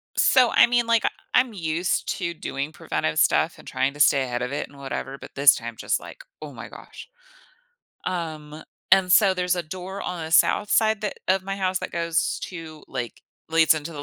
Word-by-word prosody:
so, 255 Hz, -4 st, +4 dB
I -, -, +7 dB
mean, 240 Hz, 0 st, +2 dB
like, 230 Hz, -1 st, +3 dB
I -, -, +3 dB, 0.3 s
I'm 255 Hz, -2 st, +4 dB
used 170 Hz, -1 st, -1 dB
to 170 Hz, -3 st, -2 dB
doing 140 Hz, -1 st, -4 dB
preventive 80 Hz, -, -3 dB
stuff -, -, +2 dB
and -, -, -16 dB
trying 135 Hz, +1 st, -1 dB
to -, -, -12 dB
stay 140 Hz, -1 st, +5 dB
ahead 125 Hz, -1 st, -3 dB
of 125 Hz, -, -4 dB
it 145 Hz, -, -3 dB
and 140 Hz, -, -17 dB
whatever, 135 Hz, 0 st, -5 dB
but -, -, -12 dB
this 140 Hz, -1 st, +6 dB
time, 115 Hz, 0 st, -7 dB
just -, -, -1 dB
like, -, -, -12 dB, 0.2 s
"Oh -, -, -8 dB
my -, -, -9 dB
gosh." -, -, -12 dB, 1.0 s
Um, 155 Hz, -4 st, -5 dB, 0.3 s
and 190 Hz, -1 st, +5 dB
so, 195 Hz, +1 st, +6 dB
there's 180 Hz, -1 st, 0 dB
a 175 Hz, -, -2 dB
door 185 Hz, +4 st, -7 dB
on 175 Hz, -2 st, -4 dB
the 160 Hz, -, -7 dB
south 205 Hz, +4 st, +3 dB
side 220 Hz, -2 st, +3 dB
that 210 Hz, -, -3 dB
of 190 Hz, 0 st, +2 dB
my 195 Hz, +1 st, -4 dB
house 185 Hz, -1 st, 0 dB
that -, -, -6 dB
goes 170 Hz, 0 st, -1 dB
to 160 Hz, -4 st, -9 dB
like, 125 Hz, -3 st, -6 dB, 0.3 s
leads 165 Hz, 0 st, +5 dB
into 155 Hz, +2 st, -6 dB
the 145 Hz, -, -6 dB
170 Hz, 210 wpm, -24 LUFS, 145-190 Hz, 1.0 s, I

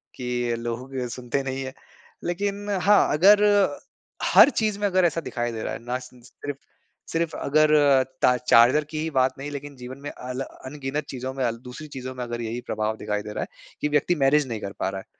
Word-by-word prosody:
कि 120 Hz, -1 st, -1 dB
लोगो 120 Hz, +2 st, -4 dB
की 130 Hz, -2 st, -4 dB
सुनते 125 Hz, +2 st, -3 dB
नहीं 135 Hz, 0 st, -3 dB
है। 130 Hz, 0 st, -6 dB, 0.5 s
लेकिन 200 Hz, +3 st, -2 dB
हाँ, 200 Hz, +1 st, +4 dB
अगर 205 Hz, +7 st, +6 dB, 0.9 s
हर -, -, +9 dB
चीज़ 215 Hz, -5 st, -1 dB
में 205 Hz, -, 0 dB
अगर 185 Hz, -2 st, +3 dB
ऐसा 165 Hz, 0 st, +1 dB
दिखाई 120 Hz, -4 st, -3 dB
दे 110 Hz, -1 st, -5 dB
रहा -, -, -3 dB
है -, -, -5 dB
ना 125 Hz, +1 st, -2 dB
सिन 125 Hz, -1 st, -14 dB
सिर्फ़ 140 Hz, +3 st, -8 dB, 0.5 s
सिर्फ़ 165 Hz, 0 st, -1 dB
अगर 155 Hz, +2 st, +3 dB, 0.5 s
ता 125 Hz, -, +5 dB
चार्जर 125 Hz, +4 st, +5 dB
की 155 Hz, -, -5 dB
ही 160 Hz, -, -1 dB
बात 130 Hz, -1 st, +2 dB
नहीं 140 Hz, +2 st, -5 dB
लेकिन 145 Hz, 0 st, -7 dB
जीवन 125 Hz, +1 st, -9 dB
में 145 Hz, -, -5 dB
अल 125 Hz, +1 st, -6 dB
अनगिनत 135 Hz, +2 st, -5 dB
चीजों 130 Hz, 0 st, -5 dB
में 135 Hz, -1 st, -2 dB
अल 115 Hz, 0 st, -1 dB
दूसरी 150 Hz, +5 st, -8 dB
चीजों 130 Hz, 0 st, -5 dB
में 125 Hz, -, -4 dB
अगर 120 Hz, 0 st, -4 dB
यहीं 115 Hz, +1 st, -4 dB
प्रभाव 110 Hz, +1 st, -2 dB
दिखाई 105 Hz, -1 st, -2 dB
दे 105 Hz, 0 st, -7 dB
रहा -, -, -2 dB
है -, -, -6 dB, 0.3 s
कि 150 Hz, -, +2 dB
व्यक्ति 150 Hz, +4 st, +2 dB
मैनेज 140 Hz, -1 st, +3 dB
नहीं 115 Hz, -3 st, -4 dB
कर 100 Hz, -, -5 dB
पा -, -, 0 dB
रहा 95 Hz, 0 st, -5 dB
है। -, -, -18 dB
130 Hz, 215 wpm, -25 LUFS, 120-155 Hz, 0.9 s, हर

